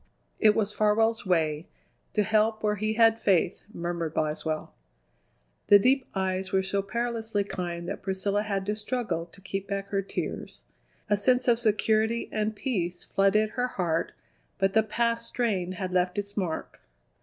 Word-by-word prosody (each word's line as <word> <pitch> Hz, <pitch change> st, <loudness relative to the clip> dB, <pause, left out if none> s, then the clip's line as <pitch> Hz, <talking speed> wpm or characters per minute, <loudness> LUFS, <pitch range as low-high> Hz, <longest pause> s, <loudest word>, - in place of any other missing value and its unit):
"It 215 Hz, -2 st, +5 dB
was 210 Hz, -1 st, 0 dB
Farwell's 220 Hz, +1 st, +2 dB
way: 160 Hz, -3 st, +1 dB, 0.5 s
to 210 Hz, -, +3 dB
help 220 Hz, +1 st, +2 dB
where 210 Hz, 0 st, +1 dB
he 215 Hz, +2 st, 0 dB
had 225 Hz, 0 st, +4 dB
faith," 190 Hz, -6 st, +2 dB
murmured 170 Hz, -3 st, -3 dB
Boswell. 155 Hz, 0 st, -2 dB, 0.9 s
The 205 Hz, -, +9 dB
deep 255 Hz, +5 st, +2 dB
eyes 190 Hz, 0 st, -1 dB
were 190 Hz, 0 st, +2 dB
so 195 Hz, +1 st, 0 dB
perilously 225 Hz, 0 st, -2 dB
kind 175 Hz, -3 st, -5 dB
that -, -, -4 dB
Priscilla 195 Hz, +2 st, 0 dB
had 200 Hz, -2 st, -2 dB
to 210 Hz, +1 st, -1 dB
struggle 210 Hz, -6 st, -2 dB
to 185 Hz, -, -16 dB
keep 195 Hz, +1 st, -4 dB
back 195 Hz, -1 st, -3 dB
her 195 Hz, -1 st, 0 dB
tears. 195 Hz, -, -5 dB, 0.4 s
A 205 Hz, -, +3 dB
sense 250 Hz, +5 st, +2 dB
of 235 Hz, -1 st, +4 dB
security 220 Hz, 0 st, +1 dB
and 215 Hz, 0 st, -1 dB
peace 180 Hz, -8 st, -2 dB
flooded 210 Hz, +2 st, +2 dB
her 250 Hz, +1 st, -1 dB
heart, 170 Hz, -7 st, -1 dB, 0.4 s
but 195 Hz, 0 st, +1 dB
the 220 Hz, -, +5 dB
past 230 Hz, +2 st, -1 dB
strain 195 Hz, -7 st, -1 dB
had 185 Hz, 0 st, -4 dB
left 180 Hz, 0 st, +1 dB
its 200 Hz, 0 st, -4 dB
mark. 180 Hz, -6 st, -3 dB
205 Hz, 160 wpm, -27 LUFS, 185-220 Hz, 0.9 s, The